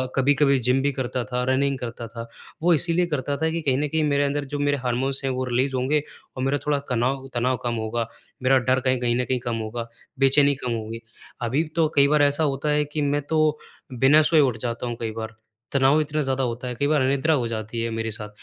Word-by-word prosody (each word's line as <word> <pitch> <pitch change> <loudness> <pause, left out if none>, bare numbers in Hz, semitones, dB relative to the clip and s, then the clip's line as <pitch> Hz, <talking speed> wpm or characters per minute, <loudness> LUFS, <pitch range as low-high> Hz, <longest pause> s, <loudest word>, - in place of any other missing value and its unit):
कभी-कभी 140 +1 +3
जिम 125 +2 +2
भी 145 - +1
करता 125 -1 -2
था, 125 0 -2
रनिंग 140 +1 +1
करता 120 -1 -6
था। 115 0 -8 0.4
वो 175 0 +5
इसीलिए 170 +3 +2
करता 140 -2 -2
था 160 0 0
कि 165 0 -2
कहीं 135 -4 +1
न 150 - 0
कहीं 160 +2 0
मेरे 145 -1 +2
अंदर 140 0 -1
जो 145 - -1
मेरे 145 0 +1
हार्मोन्स 135 +3 -1
हैं, 135 - 0
वो 130 0 -2
रिलीज 130 +2 0
होंगे 135 +4 +1 0.4
और 130 - -2
मेरा 135 +2 +1
थोड़ा 145 -1 +2
कनाव 130 +2 0
तनाव 125 +1 0
कम 120 -1 -1
होगा, 110 +1 -2 0.4
मेरा 130 +1 +5
डर 130 0 +4
कहीं 130 -1 +1
कहीं 120 -1 +1
न - - -2
कहीं 130 0 -1
कम 120 -1 -3
होगा, 115 +1 -4 0.3
बेचैनी 140 +1 +4
कम 125 - -1
होगी। 115 0 -4 0.4
अभी 125 +6 +1
तो 165 -2 +3
कई 140 -1 +6
बार 150 +1 +3
ऐसा 145 +2 +2
होता 140 +1 -1
है 150 0 +2
कि, 150 +1 -4
मैं 145 0 +1
तो 155 +1 +1 0.3
बिना 135 +5 +5
सोए 155 +1 +4
उठ 130 -6 +3
जाता 120 +1 -4
हूँ 120 - -3
कई 115 -1 -2
बार, 110 0 -6 0.4
तनाव 140 +2 +4
इतना 150 0 -2
ज़्यादा 135 -1 -1
होता 120 +1 -3
है, 125 - -4
कई 145 +4 0
बार 150 -2 +2
अनिद्रा 140 +4 +2
हो 125 -6 0
जाती 115 0 -4
है 115 - -1
मेरे 115 0 -3
साथ, 105 0 -4
135 Hz, 240 wpm, -24 LUFS, 120-145 Hz, 0.4 s, कई